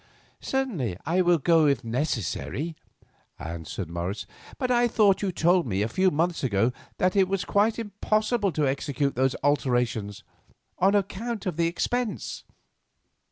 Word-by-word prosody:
"Certainly 185 - -2
I 175 +5 +2
will 175 -1 +4
go, 160 +1 +4
if 135 -3 +1
necessary," 130 - -2 0.6
answered 85 +2 -6
Morris. 85 +5 -4 0.3
"But 255 -1 -1
I 240 0 +4
thought 210 -4 +3
you 200 -2 0
told 175 -1 +2
me 100 -2 0
a - - 0
few 185 +11 +2
months 170 +1 0
ago 115 0 +2 0.2
that 185 +2 +1
it 195 -2 +4
was 195 0 -1
quite 210 +2 +2
impossible 215 0 0
to 150 -2 +1
execute 140 +1 -1
those 130 +1 +1
alterations, 120 -7 0 0.6
on 195 +3 +4
account 210 +2 -2
of 180 -4 -2
the 170 0 +2
expense." 240 +7 -2
165 Hz, 145 wpm, -26 LUFS, 125-200 Hz, 0.6 s, will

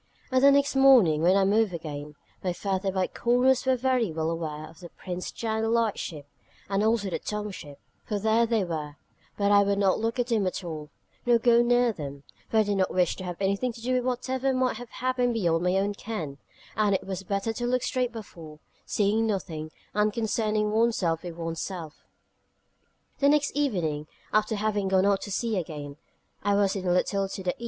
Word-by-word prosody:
And 260 0 +3
the 280 - +9
next 280 0 +3
morning, 245 - +6
when 180 +3 +4
I 195 - +3
moved 205 -1 +2
again, 150 -2 -7 0.3
my 180 -2 0
furtive 190 +1 -2
eye 185 - +3
corners 250 +4 +2
were 260 - +4
very 250 -5 +1
well 160 +1 -1
aware 155 -2 -4
of 160 - -16
the 175 -2 -10
Prince's 180 +1 -6
Channel 220 -1 -2
light 230 -2 +1
ship, 150 -5 -6 0.4
and 195 +1 0
also 215 -3 +1
the - - -2
Tongue 210 0 -4
ship, 145 -6 -10 0.3
for 210 - -2
there 220 +3 +2
they 225 -3 +1
were: 155 -4 -4 0.4
but 200 0 +2
I 200 0 +7
would 200 0 +1
not 195 -2 +2
look 225 +2 -1
at 245 - +1
them 225 -5 +1
at 185 - -3
all, 155 -3 -6 0.3
nor 240 -1 +4
go 235 0 +4
near 245 -1 +3
them: 140 -5 -7 0.3
for 225 - +1
I 220 - +6
did 205 -1 -1
not 190 -1 +1
wish 180 -2 +2
to 185 - -6
have 175 -1 -5
anything 200 +6 0
to 230 - -12
do 250 +3 -1
with 250 -1 +1
whatever 255 +1 -1
might 255 -3 +1
have 245 0 -9
happened 250 -1 0
beyond 170 -6 +1
my 180 +1 +2
own 200 +1 0
ken, 170 -10 -6 0.4
and 210 -2 +2
it - - -3
was 190 -1 -4
better 200 +3 -2
to 240 +2 -3
look 250 0 +1
straight 250 -2 0
before, 170 -9 -10 0.3
seeing 215 +2 +1
nothing, 165 -7 -3 0.2
and 210 +1 +2
concerning 215 -1 0
one's 230 +1 +2
self 165 -3 0
with 175 -2 -7
one's 165 -1 -4
self. 170 -5 -7 1.1
The 280 - +4
next 295 0 +3
evening, 175 - -1 0.3
after 215 +1 +2
having 205 -1 0
gone 190 0 +3
out 200 -1 +2
to 205 - -6
sea 225 +1 -1
again, 150 -4 -7 0.4
I 205 0 +2
was 200 -1 +2
in 190 -2 -3
a - - +3
little 195 +2 +1
to 190 - -6
the 180 - +1
E. - - -14
200 Hz, 210 wpm, -27 LUFS, 175-235 Hz, 1.1 s, the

